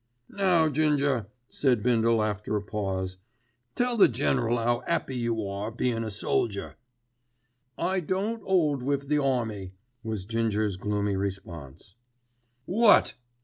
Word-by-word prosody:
"Now, 180 Hz, -5 st, +3 dB
Ginger," 145 Hz, -6 st, +1 dB, 0.2 s
said 125 Hz, -6 st, +1 dB
Bindle 115 Hz, -2 st, +3 dB
after 105 Hz, 0 st, -2 dB
a 105 Hz, -, 0 dB
pause, 95 Hz, -3 st, -3 dB, 0.6 s
"tell 245 Hz, -1 st, 0 dB
the 205 Hz, -, +8 dB
General 120 Hz, -2 st, +1 dB
'ow 120 Hz, +1 st, 0 dB
'appy 170 Hz, -6 st, -1 dB
you 115 Hz, -3 st, -1 dB
are 100 Hz, +2 st, -4 dB
bein' 115 Hz, 0 st, -1 dB
a 110 Hz, -, -3 dB
soldier." 100 Hz, 0 st, -2 dB, 1.0 s
"I 190 Hz, +1 st, 0 dB
don't 195 Hz, +7 st, -2 dB
'old 155 Hz, -8 st, +2 dB
wiv 140 Hz, +1 st, -2 dB
the 150 Hz, -1 st, +2 dB
army," 110 Hz, -8 st, -1 dB, 0.3 s
was 110 Hz, -4 st, -4 dB
Ginger's 110 Hz, -3 st, 0 dB
gloomy 105 Hz, 0 st, -1 dB
response. 90 Hz, -6 st, -6 dB, 0.7 s
"What!" 210 Hz, +3 st, +5 dB
115 Hz, 125 wpm, -27 LUFS, 105-145 Hz, 1.0 s, the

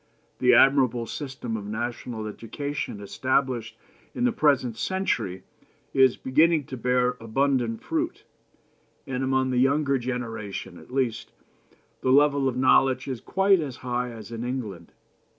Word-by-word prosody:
The -, -, +5 dB
admirable 130 Hz, -4 st, +4 dB
system 130 Hz, -3 st, -5 dB
of 105 Hz, -2 st, -5 dB
national 115 Hz, 0 st, -4 dB
education 115 Hz, +3 st, -5 dB
established 120 Hz, +1 st, -1 dB, 0.4 s
in 245 Hz, -, -1 dB
the 245 Hz, -, +3 dB
present 140 Hz, -, +2 dB
century 185 Hz, -, -2 dB, 0.5 s
is 130 Hz, -2 st, +4 dB
beginning 155 Hz, +4 st, +3 dB
to 130 Hz, -, -7 dB
bear 125 Hz, +1 st, +1 dB
abundant 120 Hz, 0 st, 0 dB
fruit, 330 Hz, +1 st, -2 dB, 0.8 s
and, 130 Hz, -1 st, -3 dB
among 130 Hz, 0 st, +1 dB
the 125 Hz, -, +1 dB
younger 140 Hz, +1 st, +2 dB
generation 115 Hz, -7 st, -5 dB
at -, -, -16 dB
least, 130 Hz, -4 st, -1 dB, 0.7 s
the 130 Hz, -, 0 dB
level 140 Hz, 0 st, +4 dB
of 125 Hz, -1 st, -1 dB
knowledge 130 Hz, 0 st, +3 dB
is 130 Hz, -4 st, -4 dB
quite 195 Hz, 0 st, +3 dB
as 140 Hz, -6 st, -4 dB
high 125 Hz, 0 st, -1 dB
as 115 Hz, -1 st, -10 dB
in 115 Hz, 0 st, -5 dB
England. 110 Hz, -9 st, -5 dB
130 Hz, 135 wpm, -26 LUFS, 115-140 Hz, 0.8 s, The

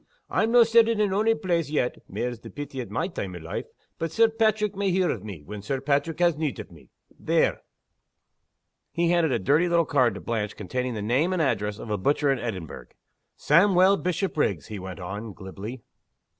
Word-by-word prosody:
I'm 225 Hz, +1 st, +1 dB
no' 240 Hz, 0 st, +8 dB
settled 230 Hz, -1 st, +4 dB
in 205 Hz, -2 st, +2 dB
ony 220 Hz, +3 st, +3 dB
place 175 Hz, -8 st, -1 dB
yet 145 Hz, -5 st, -1 dB
(mair's 120 Hz, -1 st, -3 dB
the -, -, -11 dB
pity 145 Hz, -2 st, -6 dB
at 120 Hz, -, -8 dB
my 140 Hz, -, -1 dB
time 95 Hz, -, -5 dB
o' -, -, -5 dB
life!), 80 Hz, 0 st, -5 dB, 0.3 s
but 165 Hz, -1 st, -2 dB
Sir 225 Hz, +6 st, +4 dB
Paitrick 215 Hz, -2 st, +1 dB
may 200 Hz, 0 st, 0 dB
hear 185 Hz, 0 st, +2 dB
o' 115 Hz, -, -3 dB
me, 95 Hz, -6 st, -9 dB
when 105 Hz, +6 st, -8 dB
Sir 135 Hz, +7 st, -2 dB
Paitrick 145 Hz, +3 st, 0 dB
has 175 Hz, -1 st, +3 dB
need 150 Hz, -6 st, -2 dB
o' 100 Hz, -4 st, -9 dB
me, 80 Hz, -, -17 dB, 0.3 s
there." -, -, +1 dB, 1.3 s
He 170 Hz, 0 st, +1 dB
handed 170 Hz, -4 st, +2 dB
a -, -, +2 dB
dirty 150 Hz, -, +2 dB
little 170 Hz, -1 st, +3 dB
card 130 Hz, -7 st, +2 dB
to -, -, -6 dB
Blanche 105 Hz, -3 st, -3 dB
containing 125 Hz, +5 st, -3 dB
the 105 Hz, -, -4 dB
name 135 Hz, -, +1 dB
and 185 Hz, -, -1 dB
address 105 Hz, -8 st, 0 dB
of 110 Hz, -, -7 dB
a 105 Hz, -, -1 dB
butcher 145 Hz, +6 st, +2 dB
in 135 Hz, -, 0 dB
Edinburgh. 95 Hz, -9 st, -6 dB, 0.5 s
"Sawmuel 185 Hz, +4 st, +5 dB
Bishopriggs," 160 Hz, -, -1 dB
he 105 Hz, -2 st, -5 dB
went 95 Hz, 0 st, -7 dB
on, 100 Hz, +4 st, -6 dB
glibly. 105 Hz, +6 st, -8 dB
140 Hz, 200 wpm, -26 LUFS, -, 1.3 s, no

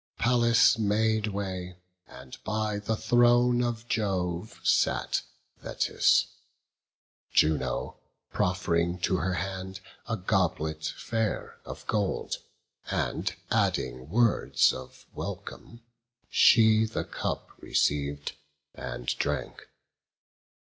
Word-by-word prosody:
Pallas 120 Hz, -1 st, +4 dB
made 110 Hz, +1 st, +1 dB
way; 95 Hz, -3 st, -4 dB, 0.3 s
and 65 Hz, 0 st, -11 dB
by 110 Hz, -1 st, -1 dB
the 110 Hz, +2 st, -1 dB
throne 120 Hz, +1 st, +4 dB
of 120 Hz, -1 st, -3 dB
Jove 95 Hz, -3 st, -2 dB
Sat -, -, +2 dB, 0.4 s
Thetis, -, -, +2 dB, 1.1 s
Juno 65 Hz, -6 st, +1 dB, 0.4 s
proff'ring 90 Hz, -1 st, 0 dB
to 95 Hz, -, +2 dB
her 95 Hz, +1 st, -1 dB
hand 95 Hz, +1 st, -4 dB, 0.3 s
A 115 Hz, -1 st, -1 dB
goblet 80 Hz, -5 st, 0 dB
fair 115 Hz, -2 st, -3 dB
of -, -, -9 dB
gold, 105 Hz, -3 st, -1 dB, 0.5 s
and -, -, -1 dB, 0.2 s
adding 65 Hz, +1 st, 0 dB
words 115 Hz, 0 st, +3 dB
Of 65 Hz, 0 st, -10 dB
welcome; 115 Hz, 0 st, -7 dB, 0.5 s
she 110 Hz, -2 st, +6 dB
the 110 Hz, -, -3 dB
cup -, -, -4 dB
receiv'd, 70 Hz, 0 st, 0 dB, 0.4 s
and -, -, -6 dB
drank. 70 Hz, 0 st, -2 dB
100 Hz, 95 wpm, -28 LUFS, 85-110 Hz, 1.1 s, she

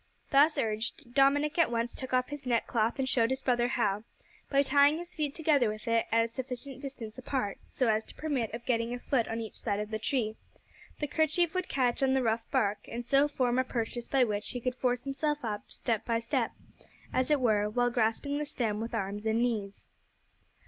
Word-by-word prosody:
Thus 295 Hz, +2 st, +5 dB
urged, 225 Hz, +2 st, -2 dB
Dominick 290 Hz, +4 st, +3 dB
at 335 Hz, -, +5 dB
once 235 Hz, 0 st, -1 dB
took 260 Hz, -, -7 dB
off 255 Hz, 0 st, +2 dB
his 290 Hz, -3 st, -7 dB
neckcloth 230 Hz, -1 st, +1 dB
and 265 Hz, -1 st, 0 dB
showed 235 Hz, -3 st, +2 dB
his 265 Hz, 0 st, -2 dB
brother 240 Hz, -2 st, +2 dB
how, 210 Hz, -5 st, 0 dB, 0.5 s
by 280 Hz, 0 st, +4 dB
tying 285 Hz, +2 st, +5 dB
his 350 Hz, +1 st, -8 dB
feet 300 Hz, -4 st, -2 dB
together 295 Hz, -7 st, +3 dB
with 215 Hz, +3 st, -6 dB
it 230 Hz, 0 st, +2 dB
at 230 Hz, 0 st, +4 dB
a 230 Hz, -, -24 dB
sufficient 260 Hz, +1 st, -6 dB
distance 255 Hz, -5 st, -7 dB
apart, 250 Hz, -6 st, -2 dB
so 255 Hz, -, 0 dB
as 220 Hz, 0 st, +2 dB
to -, -, -11 dB
permit 275 Hz, -8 st, -1 dB
of 235 Hz, +1 st, -7 dB
getting 235 Hz, -1 st, 0 dB
a -, -, -7 dB
foot 245 Hz, -2 st, 0 dB
on 225 Hz, -, -3 dB
each 220 Hz, -2 st, -6 dB
side 205 Hz, -3 st, -2 dB
of 210 Hz, +1 st, -4 dB
the 220 Hz, -, -2 dB
tree, 225 Hz, -2 st, -1 dB, 0.6 s
the 300 Hz, -, 0 dB
kerchief 315 Hz, +3 st, +1 dB
would 370 Hz, 0 st, -2 dB
catch 250 Hz, -2 st, +1 dB
on 265 Hz, 0 st, +3 dB
the 265 Hz, -, +2 dB
rough 225 Hz, 0 st, 0 dB
bark, 205 Hz, -1 st, 0 dB
and 235 Hz, +1 st, -5 dB
so 275 Hz, +4 st, +4 dB
form 255 Hz, -3 st, +1 dB
a -, -, +4 dB
purchase 240 Hz, -1 st, -3 dB
by 270 Hz, -2 st, +3 dB
which 210 Hz, -3 st, -1 dB
he 245 Hz, -, -3 dB
could 255 Hz, +1 st, -1 dB
force 250 Hz, -1 st, 0 dB
himself 290 Hz, 0 st, -1 dB
up 210 Hz, -2 st, -3 dB
step 225 Hz, -4 st, -2 dB
by 230 Hz, -1 st, 0 dB
step, 230 Hz, 0 st, 0 dB, 0.6 s
as 255 Hz, +2 st, +1 dB
it 295 Hz, -2 st, +4 dB
were, 210 Hz, -4 st, +2 dB
while 245 Hz, +2 st, +1 dB
grasping 240 Hz, +5 st, 0 dB
the 300 Hz, -, -2 dB
stem 220 Hz, -6 st, -1 dB
with 230 Hz, +1 st, -4 dB
arms 205 Hz, +1 st, -3 dB
and 220 Hz, +1 st, +2 dB
knees. 210 Hz, -5 st, -2 dB
245 Hz, 215 wpm, -30 LUFS, 225-275 Hz, 0.6 s, Thus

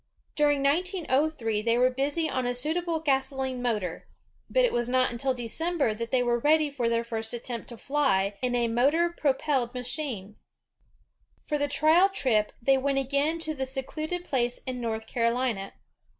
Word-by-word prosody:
During 290 Hz, -2 st, +2 dB
1903 295 Hz, -, +1 dB
they 230 Hz, +2 st, +2 dB
were 255 Hz, +1 st, +4 dB
busy 285 Hz, +5 st, 0 dB
on 255 Hz, -4 st, -1 dB
a 245 Hz, -, -1 dB
suitable 325 Hz, +5 st, -1 dB
gasoline 265 Hz, -3 st, -1 dB
motor, 210 Hz, -8 st, -2 dB, 0.4 s
but -, -, +4 dB
it -, -, 0 dB
was 240 Hz, 0 st, 0 dB
not 255 Hz, 0 st, +2 dB
until 255 Hz, +2 st, -1 dB
December 275 Hz, +2 st, -1 dB
that 230 Hz, +2 st, -5 dB
they 250 Hz, 0 st, +2 dB
were 240 Hz, 0 st, +1 dB
ready 300 Hz, +2 st, +3 dB
for 245 Hz, -4 st, -1 dB
their 230 Hz, 0 st, +1 dB
first 225 Hz, 0 st, -4 dB
attempt 240 Hz, 0 st, -6 dB
to 235 Hz, -, -9 dB
fly 225 Hz, -8 st, +1 dB
in 250 Hz, -1 st, 0 dB
a 240 Hz, -1 st, +2 dB
motor 285 Hz, +9 st, +2 dB
propelled 270 Hz, -5 st, 0 dB
machine. 245 Hz, -5 st, -5 dB, 1.1 s
For 295 Hz, -, -1 dB
the 290 Hz, -, +1 dB
trial 315 Hz, +6 st, +4 dB
trip, 230 Hz, -, +1 dB
they 270 Hz, +2 st, +3 dB
went 275 Hz, +1 st, 0 dB
again 280 Hz, +4 st, +1 dB
to 315 Hz, -1 st, -1 dB
the 265 Hz, -3 st, -3 dB
secluded 310 Hz, +6 st, -3 dB
place 245 Hz, -4 st, 0 dB
in 255 Hz, -2 st, -4 dB
North 220 Hz, -1 st, -3 dB
Carolina. 235 Hz, -4 st, -1 dB
260 Hz, 165 wpm, -27 LUFS, 235-295 Hz, 1.1 s, were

